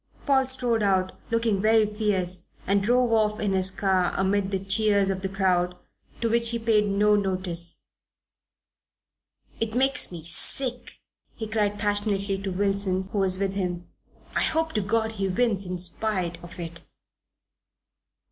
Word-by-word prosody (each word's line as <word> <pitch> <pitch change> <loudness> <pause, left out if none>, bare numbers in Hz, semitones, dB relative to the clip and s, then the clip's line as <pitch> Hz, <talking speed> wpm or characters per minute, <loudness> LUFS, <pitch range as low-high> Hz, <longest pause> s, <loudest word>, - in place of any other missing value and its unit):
Paul 265 -2 +3
strode 245 -3 0
out, 190 -2 +2 0.2
looking 230 -4 +1
very 220 +1 +4
fierce, 195 -4 -1 0.2
and 200 +1 +2
drove 245 +3 +2
off 215 -1 +2
in 205 -2 0
his 190 0 +2
car 190 -2 +1
amid 195 0 +1
the 195 - 0
cheers 200 0 +2
of 190 0 -3
the 190 - -2
crowd, 180 -2 +1 0.4
to 230 - +2
which 235 0 +2
he 235 - -1
paid 220 -2 +2
no 210 +1 +4
notice. 185 -4 -3 1.8
"It 225 0 -2
makes 270 -1 +2
me 170 -3 -7
sick!" 245 - -2 0.4
he 225 - -5
cried 210 -1 0
passionately 205 -2 -1
to 195 - -3
Wilson, 195 0 0
who 205 - -1
was 190 -1 +1
with 195 0 -1
him. 180 -3 -3 0.5
"I - - +2
hope 320 0 +1
to 215 - +1
God 220 +2 0
he 195 -3 -2
wins 200 -1 0
in 180 0 -3
spite, 180 -1 -2
of 175 +1 -11
it!" 165 -1 -7
200 Hz, 155 wpm, -26 LUFS, 185-220 Hz, 1.8 s, very